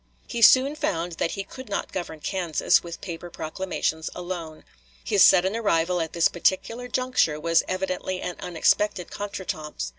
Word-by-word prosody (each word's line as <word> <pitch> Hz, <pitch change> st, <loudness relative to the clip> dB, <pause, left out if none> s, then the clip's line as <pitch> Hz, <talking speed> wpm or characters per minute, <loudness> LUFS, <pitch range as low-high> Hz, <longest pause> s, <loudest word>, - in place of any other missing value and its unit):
He 235 Hz, -, -4 dB
soon 265 Hz, +5 st, +7 dB
found 175 Hz, -, -2 dB
that 165 Hz, -, 0 dB
he 195 Hz, -, -3 dB
could 260 Hz, +4 st, -11 dB
not 200 Hz, -, -3 dB
govern 165 Hz, -4 st, -5 dB
Kansas 175 Hz, -5 st, +1 dB
with 170 Hz, -1 st, -8 dB
paper 175 Hz, -1 st, -7 dB
proclamations 160 Hz, -1 st, -3 dB
alone. 175 Hz, -3 st, -6 dB, 0.4 s
His 200 Hz, -, +4 dB
sudden 190 Hz, +2 st, +5 dB
arrival 180 Hz, -5 st, +1 dB
at 160 Hz, -, -4 dB
this 170 Hz, -1 st, +4 dB
particular 230 Hz, +7 st, -1 dB
juncture 250 Hz, -12 st, +1 dB
was 165 Hz, +1 st, +3 dB
evidently 185 Hz, 0 st, -2 dB
an 180 Hz, -1 st, -4 dB
unexpected 180 Hz, +2 st, +1 dB
contretemps. 190 Hz, -7 st, -5 dB
180 Hz, 150 wpm, -25 LUFS, 165-200 Hz, 0.4 s, soon